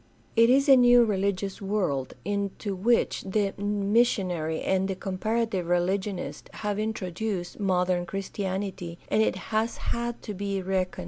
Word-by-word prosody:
It 230 0 +6
is 275 +3 +4
a 270 - +9
new 245 -1 +6
religious 200 -1 -1
world 185 -10 -1
into 200 0 -2
which 225 +6 +1
the 195 0 0
missionary 200 -5 +1
and 190 0 +1
the 190 - -2
com 185 0 -5
parative 220 -4 0
religionist 185 +2 -1
have 210 -1 -3
introduced 200 -3 -3
modern 180 -2 +1
Christianity, 190 -2 -4
and 215 - +3
it - - +2 0.2
has 220 +2 +1
had 235 0 -3
to 210 - -5
be 200 0 -2
reckoned 185 0 0
with. - - -10
195 Hz, 145 wpm, -27 LUFS, 185-215 Hz, 0.2 s, a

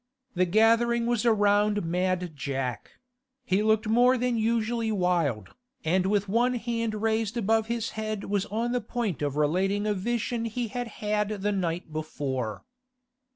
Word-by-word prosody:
The 185 0 +2
gathering 230 +4 +3
was 240 0 +1
around 205 -2 +3
Mad 180 -1 -1
Jack; 135 -4 -4 0.5
he 190 0 +2
looked 220 0 +2
more 245 +3 +4
than 250 0 0
usually 230 0 0
wild, 170 - 0 0.4
and 185 +3 +2
with 205 0 +1
one 240 +5 +2
hand 230 -2 -2
raised 225 0 0
above 225 0 +1
his 230 -1 -2
head 215 -1 -4
was 205 0 -1
on 230 +3 -1
the 245 0 0
point 220 -6 -3
of 145 -1 -1
relating 190 +7 +1
a 210 - +1
vision 230 +3 -2
he 230 +1 -3
had 245 +3 -4 0.2
had 210 0 +1
the 210 - +2
night 175 -4 -2
before. 135 -7 -4
210 Hz, 155 wpm, -27 LUFS, 180-230 Hz, 0.5 s, more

